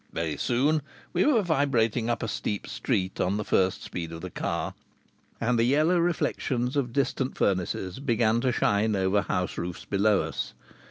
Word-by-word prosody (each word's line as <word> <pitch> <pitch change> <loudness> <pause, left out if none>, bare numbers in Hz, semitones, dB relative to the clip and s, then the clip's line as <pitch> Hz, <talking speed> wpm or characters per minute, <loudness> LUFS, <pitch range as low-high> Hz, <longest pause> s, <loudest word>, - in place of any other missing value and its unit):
Very 80 -2 -2
soon 145 +6 +1 0.3
we 180 - +3
were 240 -8 +4
vibrating 125 - +1
up 120 - -1
a - - -1
steep 105 -1 -3
street 95 -7 -1
on 95 +3 +1
the 105 - -3
first 95 0 +1
speed 85 -2 -5
of 85 0 -7
the 95 0 -6
car, - - -2 0.7
and 120 0 +1
the - - +4
yellow 155 +8 +3
reflections 140 -6 0
of 130 -4 0
distant 135 0 -1
furnaces 95 +1 -1
began 115 -4 +2
to 130 - +2
shine 105 -1 +2
over 95 +1 +2
house 90 -1 -2
roofs 85 0 -5
below 100 +1 +2
us. - - -4
115 Hz, 170 wpm, -27 LUFS, 95-135 Hz, 0.7 s, were